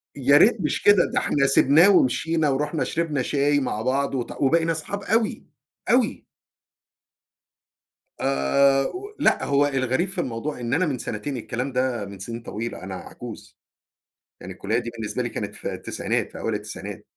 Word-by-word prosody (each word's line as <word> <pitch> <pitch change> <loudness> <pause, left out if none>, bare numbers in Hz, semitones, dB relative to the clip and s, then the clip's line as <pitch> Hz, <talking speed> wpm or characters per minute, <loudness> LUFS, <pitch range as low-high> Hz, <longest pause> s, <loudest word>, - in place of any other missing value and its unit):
يا 140 +1 +5
ريت 210 +5 +5
مش - - -1
كده، 205 -3 +5
ده - - +3
إحنا 140 -1 +1
سِبناه 145 +6 +6
ومشينا 160 -2 +2
ورُحنا 150 +3 -1
شربنا 160 -5 -1
شاي 145 +2 +1
مع 120 -5 -2
بعض 135 +3 0
وات 120 -2 -3
وبقينا 165 +4 +3
اصحاب 195 +5 -4
أوي، 220 +1 0 0.4
أوي. 245 -2 +1 1.9
آآ، 135 - +3
و 405 +3 -8
لأ - - +3
هو 140 0 +3
الغريب 135 +5 0
في 190 -2 -1
الموضوع 125 +1 -4
إن 120 0 -3
أنا 180 +6 +2
من 145 -6 -2
سنتين، 120 +5 -4
الكلام 125 +3 -4
ده 125 -4 -1
من 100 -1 -10
سنين 115 +4 -6
طويلة 115 -2 -6
أنا 95 0 -6
عجوز، 90 - -10 0.8
يعني 95 - -8
الكُلّية 100 +5 -2
دي 120 -1 -4
بالنسبة 115 0 -4
لي 120 - -2
كانت - - -5
في - - -5
التسعينات - - -3
في - - -9
أوائل - - -2
التسعينات. - - -7
135 Hz, 165 wpm, -24 LUFS, 120-160 Hz, 1.9 s, سِبناه